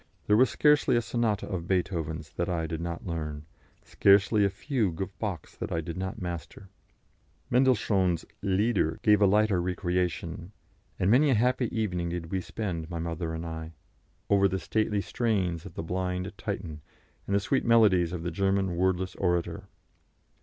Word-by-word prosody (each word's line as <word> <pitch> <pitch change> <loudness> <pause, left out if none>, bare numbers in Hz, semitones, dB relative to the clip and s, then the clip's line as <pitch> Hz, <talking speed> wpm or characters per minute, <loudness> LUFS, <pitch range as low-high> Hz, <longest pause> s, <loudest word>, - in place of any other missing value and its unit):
There 105 - +4
was 125 +2 +5
scarcely 150 +5 +3
a 120 - +3
sonata 110 -1 -1
of 85 -2 -4
Beethoven's 80 -5 -2
that 85 - -2
I 85 -2 -1
did 80 0 -4
not 85 0 -5
learn, 75 -4 -4 0.4
scarcely 100 +2 +4
a 100 - +3
fugue 105 - -2
of 95 0 -5
Bach's 100 -6 -4
that - - -5
I 80 - 0
did 80 0 -5
not 95 0 -4
master. 90 +2 -6 0.8
Mendelssohn's 100 -9 +2 0.2
"Lieder" 100 -4 +1
gave 105 -1 +5
a 100 - +6
lighter 105 -2 +3
recreation, 90 0 -2 0.4
and 95 - +2
many 140 +5 +5
a 130 - +4
happy 125 +2 +2
evening 90 -6 -2
did 85 -1 -5
we 95 -1 -1
spend, 90 -6 -4
my 85 - -4
mother 80 0 -3
and 80 +1 -5
I, 80 0 -6 0.5
over 100 -1 +4
the 95 0 -2
stately 105 +2 0
strains 95 -8 -1
of 85 - -13
the - - -4
blind 90 +3 -3
Titan, 90 -8 -5 0.5
and 100 - +1
the - - +4
sweet 130 +7 0
melodies 105 -8 +4
of 85 -2 -4
the 90 - -2
German 95 0 0
wordless 95 +1 0
orator. 90 -2 -1
95 Hz, 165 wpm, -28 LUFS, 85-105 Hz, 0.8 s, a